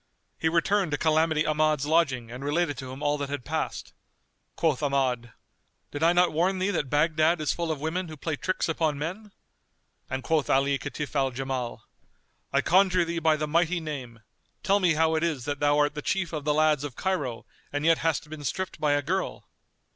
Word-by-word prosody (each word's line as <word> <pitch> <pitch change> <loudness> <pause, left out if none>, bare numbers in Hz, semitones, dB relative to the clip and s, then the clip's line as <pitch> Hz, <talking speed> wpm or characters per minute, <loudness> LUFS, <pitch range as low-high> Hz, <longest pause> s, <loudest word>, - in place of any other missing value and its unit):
He 160 - +2
returned 180 +3 +2
to - - +1
Calamity 160 0 +2
Ahmad's 155 -2 +1
lodging 140 -7 +1
and 125 +3 -7
related 145 +1 0
to 130 -1 -7
him 135 +3 -8
all 145 0 +1
that 140 -1 -3
had 140 -3 -4
passed. - - -3 0.6
Quoth 155 -5 +1
Ahmad, 130 -5 0 0.6
"Did 145 - -5
I 165 +1 +5
not 175 0 +3
warn 180 +5 +1
thee 190 +2 0
that 150 -8 -1
Baghdad 155 +3 +2
is 155 - 0
full 170 -1 -3
of 155 - -3
women 170 +5 -2
who 155 -1 -9
play 155 +2 -2
tricks 185 +6 -1
upon 160 -2 0
men?" 185 +8 -5 0.8
And 130 0 -3
quoth 155 +1 +1
Ali 135 +1 +2
Kitf 150 +3 -5
al 135 -1 +2
Jamal, 130 -1 -4 0.7
"I - - +3
conjure 185 -1 +4
thee 170 0 -2
by 160 -1 +3
the 150 0 -2
Mighty 170 +3 +2
Name, 130 -8 -7 0.4
tell 200 +1 +3
me 175 -4 +3
how 160 +1 +3
it 160 - +1
is 155 -7 -1
that 145 -1 -3
thou 145 0 +3
art 145 0 +2
the 150 - -5
chief 175 +1 -1
of 150 -2 -4
the 150 - +2
lads 155 -2 +3
of 145 -4 -6
Cairo 175 -12 -2 0.3
and 145 +1 -2
yet 165 0 +4
hast 160 -2 0
been 150 -1 -8
stripped 190 +6 -3
by 150 -1 +3
a 145 0 +1
girl?" 185 +7 -2
155 Hz, 205 wpm, -27 LUFS, 140-170 Hz, 0.8 s, I